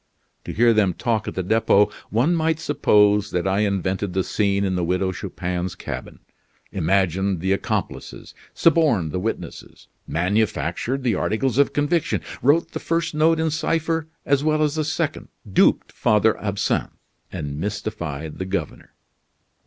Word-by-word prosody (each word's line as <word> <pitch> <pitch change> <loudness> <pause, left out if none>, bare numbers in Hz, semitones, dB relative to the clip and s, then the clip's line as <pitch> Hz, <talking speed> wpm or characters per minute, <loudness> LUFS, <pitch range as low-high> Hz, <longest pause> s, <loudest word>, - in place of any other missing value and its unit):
To - - -4
hear 115 +1 +4
them 100 -5 +2
talk 110 -3 -1
at - - -4
the 95 - -1
Depot, 105 0 +3 0.2
one 125 +10 +2
might 160 -1 +1
suppose 105 -9 +3
that 90 +1 -1
I 95 +1 +1
invented 100 -2 -1
the 95 0 +1
scene 100 0 0
in 95 - 0
the 90 - -1
Widow 90 +2 0
Chupin's 90 0 -4
cabin; - - -7 0.5
imagined 95 +1 +1
the 95 +3 -1
accomplices; 100 - -3 0.2
suborned 145 - +3
the 90 - -2
witnesses; 110 +5 -6 0.2
manufactured 110 - -1
the 120 -3 +2
articles 115 +6 0
of 140 - +4
conviction; 145 +3 +1 0.2
wrote 145 +6 +3
the - - -4
first 165 0 -1
note 160 +2 +3
in 160 -1 +1
cipher 160 +1 -1 0.2
as 140 0 +2
well 155 0 +2
as 150 -1 +1
the 155 0 -1
second; 160 0 -2 0.2
duped 95 - +3
Father 110 +1 +2
Absinthe, 100 -1 -1 0.3
and 75 -5 -5
mystified 80 -7 -4
the 95 - -2
governor." 95 -5 -5
105 Hz, 150 wpm, -22 LUFS, 95-145 Hz, 0.5 s, hear